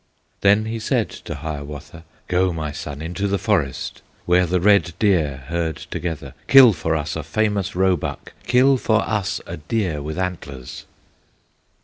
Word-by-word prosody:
Then 100 +2 +4
he 115 +1 -3
said 110 - 0
to - - -5
Hiawatha: 75 +1 -7 0.2
"Go, 90 +1 +2
my 80 -3 -4
son, 75 0 -6
into 90 +5 -2
the 100 0 +1
forest, 85 - -1 0.2
Where 90 0 +3
the 90 +2 +1
red 90 -3 +4
deer 80 -10 +1
herd 85 +1 -2
together, 80 -6 -5
Kill 130 -5 +9
for 80 -1 -1
us 75 0 -3
a 80 - -2
famous 100 +5 -1
roebuck, 95 -1 -1
Kill 130 +3 +5
for 110 -3 +2
us 105 -4 -1
a - - -6
deer 80 -1 -2
with 75 +3 -5
antlers!" 70 -9 -5
90 Hz, 150 wpm, -21 LUFS, 75-100 Hz, 0.2 s, Kill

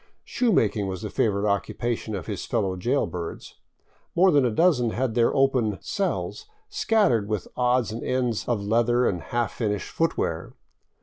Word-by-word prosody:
Shoe 245 -3 0
making 105 - +2
was 95 +2 -5
the 105 - -4
favorite 105 -5 +1
occupation 110 +2 -2
of 90 -6 -5
his - - -5
fellow 95 -2 0
jailbirds. 90 -5 -3 0.6
More 185 +2 +5
than 145 -3 +4
a - - +3
dozen 125 -2 +3
had 120 +1 -1
their 115 0 +3
open 130 -7 +2
" - - -36 0.2
cells 305 - -2
" - - -40
scattered 205 - +2
with 105 -3 -3
odds 125 -2 +1
and 115 - -5
ends 125 -4 -1
of 110 -4 -1
leather 120 +3 +2
and 90 -3 -1
half 120 -1 -2
finished 105 -4 -2
footwear. 85 - -1
120 Hz, 170 wpm, -25 LUFS, 105-130 Hz, 0.6 s, More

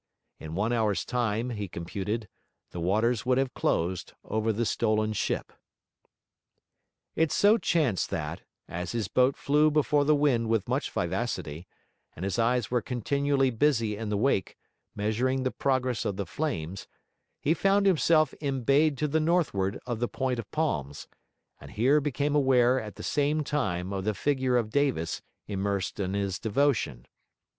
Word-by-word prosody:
In 80 +1 -7
one 105 +5 0
hour's 110 -4 +1
time, 120 -1 -1
he 105 -3 -4
computed, 100 +6 -4 0.4
the 90 - -6
waters 110 +6 +1
would 125 0 +2
have 135 -2 0
closed 90 +2 -1
over 110 +1 0
the 115 +2 -1
stolen 110 -1 +1
ship. - - -2 1.6
It 160 -2 +2
so 210 +3 +4
chanced 160 - +1
that, 80 +1 -4 0.3
as 90 +5 -5
his 115 -4 -1
boat 130 +5 +2
flew 150 +2 +3
before 150 -1 +2
the 150 +1 +4
wind 130 -6 +2
with 110 -3 +1
much - - -1
vivacity, 80 +5 -3 0.5
and 90 - -5
his 100 +4 -1
eyes 120 0 +1
were 125 -1 +2
continually 135 +3 0
busy 115 -4 +1
in 110 0 -5
the 105 - 0
wake, 110 -3 0 0.4
measuring 120 +6 0
the 130 - 0
progress 130 -3 0
of 100 - -2
the 100 - -2
flames, 95 - -4 0.5
he 155 - +2
found 195 +4 +2
himself 160 -5 +4
embayed 140 +2 +2
to 150 - 0
the 155 +2 +1
northward 155 - +1
of 120 -3 -3
the 120 - 0
point 130 -1 -2
of 110 - -7
palms, 75 - -2 0.5
and - - -12
here 135 +7 +3
became 145 +1 -1
aware 130 -3 +4
at 105 -3 -8
the - - -9
same 150 +1 +1
time 100 -11 -2
of 95 -1 -3
the 110 -1 0
figure 130 +2 +1
of 110 -3 -1
Davis 130 - 0 0.3
immersed 100 -2 -2
in 95 0 -1
his 100 -2 -2
devotion. 110 - 0
120 Hz, 160 wpm, -28 LUFS, 100-140 Hz, 1.6 s, so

